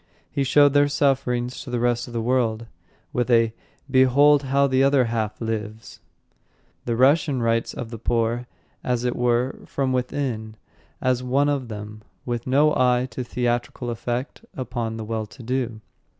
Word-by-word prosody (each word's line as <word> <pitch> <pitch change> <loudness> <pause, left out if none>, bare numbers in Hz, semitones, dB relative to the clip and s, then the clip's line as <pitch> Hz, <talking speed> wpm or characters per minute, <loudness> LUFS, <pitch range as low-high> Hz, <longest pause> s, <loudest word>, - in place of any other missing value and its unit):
He 140 - 0
showed 145 +1 +5
their 145 0 +5
sufferings 130 -4 0
to 140 - -9
the 120 -1 -1
rest 120 0 0
of 120 - -10
the 115 -1 -2
world 115 -2 0 0.5
with 125 0 0
a 115 -2 +4 0.3
"Behold 140 +2 +5
how 140 0 +2
the 130 -1 +2
other 135 -2 +4
half 110 -2 -2
lives!" 110 -1 -5 0.9
The 120 - -1
Russian 140 +2 +3
writes 115 0 +1
of 120 -2 -6
the 115 - -7
poor, 115 +1 0 0.4
as 125 -1 -1
it 125 - 0
were, 125 +1 0
from 135 -2 -1
within, 125 -4 -2 0.5
as 130 -1 +1
one 135 +3 +1
of 140 -4 -1
them, 105 -1 -8 0.2
with 120 -1 -3
no 145 +4 +4
eye 125 0 +2
to 125 +3 -4
theatrical 120 0 -2
effect 120 +3 -4
upon 115 -3 -3
the 110 - -5
well 110 -1 -3
to 120 - -13
do. 120 -2 -2
125 Hz, 165 wpm, -23 LUFS, 115-130 Hz, 0.9 s, showed